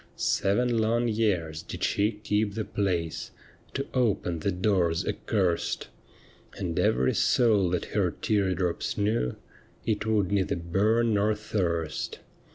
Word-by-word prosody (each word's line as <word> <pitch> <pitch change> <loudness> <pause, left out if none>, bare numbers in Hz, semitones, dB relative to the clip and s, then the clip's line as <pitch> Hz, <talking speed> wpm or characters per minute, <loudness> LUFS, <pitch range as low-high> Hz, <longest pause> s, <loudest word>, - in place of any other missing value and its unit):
Seven 120 +4 +1
long 115 +2 +2
years 95 -9 0
did - - -7
she 105 +2 +2
keep 105 -1 -1
the 110 -1 -2
place. 90 -5 -2 0.5
To 135 - -1
open 105 -9 +1
the 100 +5 0
doors 90 -3 +1
accurst; 95 -6 -1 0.7
And 85 -3 -2
every 65 +1 +2
soul 105 -7 +3
that 90 -1 -1
her - - +2
tear 100 -3 0
drops 90 -3 -2
knew 105 - 0 0.3
— - - -31
It 110 -1 -1
would 105 -4 +1
neither 100 -2 +1
burn 105 +7 +1
nor 105 +1 +2
thirst. 85 -7 -2
100 Hz, 135 wpm, -27 LUFS, 85-110 Hz, 0.7 s, soul